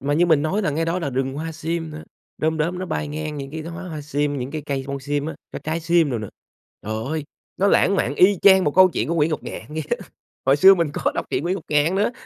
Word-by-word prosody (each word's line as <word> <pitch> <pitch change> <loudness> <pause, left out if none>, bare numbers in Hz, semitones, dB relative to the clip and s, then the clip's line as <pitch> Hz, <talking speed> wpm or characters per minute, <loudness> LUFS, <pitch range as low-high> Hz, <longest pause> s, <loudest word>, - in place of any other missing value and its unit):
Mà 145 +2 0
như 175 +3 +3
mình 160 -4 +4
nói 190 +8 0
là 170 - +1
ngay 160 +3 -1
đó 165 +2 -1
là 155 -6 -3
rừng 135 +1 -1
hoa 160 +3 -4
sim 160 +1 -3
nữa, 155 0 -8 0.4
đom 160 0 0
đóm 170 +4 -1
nó 185 - -4
bay 155 -2 -3
ngang 155 0 -4
những 135 -1 -6
cái 160 +1 -5
đoá 170 +2 -7
hoa 165 -2 -6
sim, 145 -1 -1
những 125 +2 -4
cái 155 0 -4
cây 135 -1 -2
bông 140 0 -4
sim 145 +1 -2
á, 160 - -4 0.2
cái - - -6
trái 160 +2 -2
sim 165 -2 +2
đồ 120 - -1
nữa. 105 -2 -6 0.5
Trời 110 +2 -4
ơi, 155 +1 -3 0.3
nó 195 - +2
lãng 200 0 +4
mạn - - 0
y 195 +1 +5
chang 190 -2 +7
một 145 - 0
câu 185 0 +7
chuyện - - -2
của 170 - 0
Nguyễn 160 -1 +2
Ngọc 155 - -2
Ngạn - - -6
vậy 155 +1 -4
đó, - - +2 0.5
hồi 135 +1 +5
xưa 190 +6 +8
mình 170 -4 0
có - - 0
đọc - - -2
truyện - - -1
Nguyễn 180 +2 0
Ngọc 185 - -7
Ngạn 150 +4 +2
nữa. 205 +4 +1
155 Hz, 290 wpm, -22 LUFS, 145-170 Hz, 0.5 s, xưa